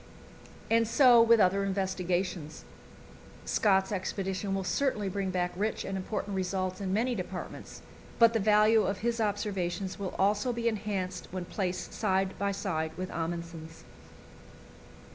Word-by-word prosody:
And 230 0 +4
so 240 0 +6
with 230 0 +6
other 195 +1 +3
investigations. 185 -4 -2 0.8
Scott's 190 -2 +2
expedition 195 0 -2
will 195 - -2
certainly 215 -1 0
bring 195 0 -2
back 180 -1 -1
rich 210 +4 -2
and 195 - -3
important 200 +1 -3
results 185 0 -2
in 190 -1 -2
many 235 +6 +1
departments, 185 -3 -7 0.3
but 230 -1 +6
the 225 - +2
value 215 +2 +5
of 200 -2 -2
his 235 0 0
observations 195 -3 -2
will 195 -2 -4
also 205 +5 +2
be 235 0 -2
enhanced 205 -4 -3
when 185 -1 -5
placed 180 -1 -3
side 190 -2 0
by 200 0 0
side 160 -5 -3
with 185 0 -4
Amundsen's. 165 -1 -5
195 Hz, 140 wpm, -30 LUFS, 185-215 Hz, 0.8 s, so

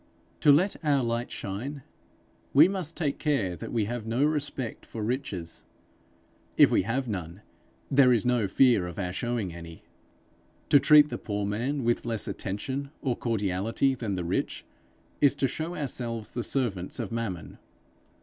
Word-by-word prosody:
To 145 - +6
let 175 +6 +2
our 140 -4 +2
light 115 +1 -1
shine, 125 +9 -5 0.7
we 150 +5 +9
must 185 -5 -4
take 145 -5 -1
care 115 - 0
that 80 - -7
we 115 -3 +1
have 115 0 -4
no 120 +5 +1
respect 145 -5 -2
for 110 - -6
riches: 105 -8 -4 0.9
if - - +7
we - - +4
have 125 +6 -2
none, 90 -2 -5 0.5
there 135 -2 +6
is 120 -3 +2
no 120 -4 +2
fear 115 -3 +4
of 85 - -8
our 90 -2 -3
showing 115 -4 -2
any. 85 -1 -10 0.9
To 145 - +7
treat 150 +1 +7
the - - -5
poor 105 -1 -3
man 120 +7 -2
with 120 0 +1
less 115 -3 -3
attention 130 +8 -4
or 125 -3 0
cordiality 110 +4 0
than 115 -6 -3
the 90 -2 -3
rich, 85 - -2 0.6
is 145 -1 +5
to 140 -1 +1
show 160 +6 -4
ourselves 120 -6 -3
the 120 - -3
servants 110 -9 -1
of - - -4
Mammon. 110 -8 -4
120 Hz, 160 wpm, -28 LUFS, 100-140 Hz, 0.9 s, we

